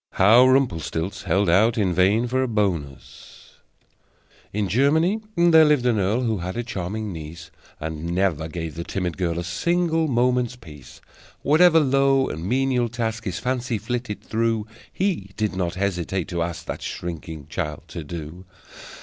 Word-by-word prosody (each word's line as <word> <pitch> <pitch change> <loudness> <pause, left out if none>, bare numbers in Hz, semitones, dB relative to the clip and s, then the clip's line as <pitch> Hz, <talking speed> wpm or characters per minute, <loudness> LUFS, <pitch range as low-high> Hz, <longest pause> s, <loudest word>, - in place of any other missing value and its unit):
How 115 +7 +6
Rumplestilz 95 - 0
Held 95 +4 +2
Out 110 +7 +4
in 95 -5 +1
Vain 95 +7 +3
for 130 +2 0
a 130 - 0
Bonus 90 - -4 0.9
In 105 0 -1
Germany 155 - +2
there 170 -2 +6
lived 150 -5 +3
an 120 -4 +2
earl 100 +6 +1
Who 110 -4 0
had 90 +4 -5
a 120 - -1
charming 105 -1 -4
niece: 80 +1 -9 0.3
And 80 0 -5
never 90 -5 0
gave 80 -1 -5
the 85 - -5
timid 90 -1 -3
girl 85 -2 -1
A 85 - -2
single 165 - 0
moment's 125 -1 +1
peace! 80 - -14 0.4
Whatever 165 +3 +6
low 135 -1 +3
and 80 +1 -5
menial 125 +3 +1
task 115 -1 -3
His 95 -2 -3
fancy 125 -2 -2
flitted 115 0 -4
through, 115 -1 0 0.3
He 175 - -2
did 105 -3 -1
not 90 -2 -2
hesitate 95 -2 -2
to 85 -1 -2
ask 85 0 -4
That - - -5
shrinking 80 -3 -6
child 75 0 -4
to 85 - -6
do. 85 +4 -8
105 Hz, 160 wpm, -23 LUFS, 85-125 Hz, 0.9 s, How